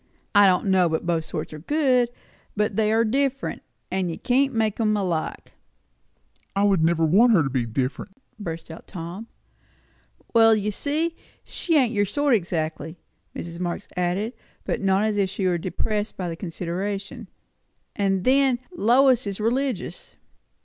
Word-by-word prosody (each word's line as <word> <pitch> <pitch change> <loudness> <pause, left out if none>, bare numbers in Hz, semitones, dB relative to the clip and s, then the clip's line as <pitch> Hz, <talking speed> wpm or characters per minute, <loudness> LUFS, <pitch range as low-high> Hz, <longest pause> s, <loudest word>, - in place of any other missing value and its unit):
I 205 -1 +7
don't 180 +1 +2
know 190 -3 +3
but 160 +1 -2
both 165 -2 0
sorts - - -5
are 155 - -7
good; 255 - +2 0.5
but 210 0 0
they 215 -1 +2
are 225 +1 +3
different, 275 +3 -1 0.3
and 185 -1 0
you 165 - -4
can't 270 +2 +2
make 220 -3 0
'em 215 -2 +2
alike." 175 -5 -3 1.0
"I 200 - +2
would 195 -5 +3
never 165 0 +3
want 220 +9 +5
her 175 -7 +5
to 135 - -2
be 125 -3 -1
different!" 130 - -3 0.3
burst 165 -4 -6
out 160 - -11
Tom. 180 +6 -7 1.1
"Well, 225 -1 +6
you 210 0 -1
see, 310 +9 -1 0.3
she 330 -3 0
ain't 250 -4 +2
your 205 -1 +2
sort 285 +5 +1
exactly," 165 -4 -2 0.4
Mrs. 170 0 -7
Marx 180 +2 -3
added, 180 +6 -1 0.3
but - - -2
not 195 +1 +2
as 215 -1 0
if 195 -2 +1
she 195 0 -3
were 175 -2 +1
depressed 210 +4 -3
by 185 - -3
the 165 - -4
consideration. 195 +6 -4 0.7
"And 195 -2 0
then, 265 0 +4 0.2
Lois 250 -1 +4
is 200 0 -4
religious." 260 - -2
200 Hz, 160 wpm, -24 LUFS, 175-235 Hz, 1.1 s, I